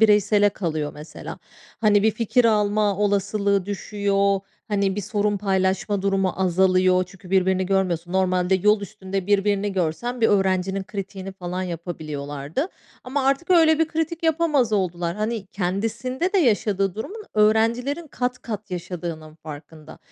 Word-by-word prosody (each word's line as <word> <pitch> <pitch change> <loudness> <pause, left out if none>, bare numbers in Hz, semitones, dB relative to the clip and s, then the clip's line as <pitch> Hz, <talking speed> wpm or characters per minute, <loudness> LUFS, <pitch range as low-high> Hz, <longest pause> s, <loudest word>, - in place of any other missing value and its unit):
bireysele 205 -1 +5
kalıyor 155 -7 -3
mesela. 150 +2 -9 0.4
Hani, 210 -2 +4
bir 220 - +4
fikir 230 +3 +1
alma 210 -2 +2
olasılığı 200 -1 +1
düşüyor, 200 -1 0 0.3
hani 200 -2 0
bir - - -1
sorun 205 +1 0
paylaşma 190 0 0
durumu 195 -2 +1
azalıyor. 185 0 +3
Çünkü 185 -1 -15
birbirini 190 0 +2
görmüyorsun. 180 -3 0
Normalde 185 0 +2
yol 210 +3 +3
üstünde 195 -2 -5
birbirini 205 0 +1
görsen, 195 +8 -2
bir 225 - +4
öğrencinin 190 -1 +1
kritiğini 195 -1 -6
falan 185 0 -4
yapabiliyorlardı 155 - -4 0.4
ama 265 +1 -1
artık 275 +6 +1
öyle 320 -3 +5
bir 325 -1 +2
kritik 325 +1 -2
yapamaz 310 -7 +2
oldular. 175 -4 0
Hani, 215 -1 -2
kendisinde 225 - -2
de 400 - +3
yaşadığı 205 - +2
durumun, 410 - -6
öğrencilerin 230 +8 +2
kat 250 -1 -3
kat 210 -3 -6
yaşadığının 170 -3 -6
farkında. 155 0 -11
200 Hz, 135 wpm, -23 LUFS, 185-220 Hz, 0.4 s, bireysele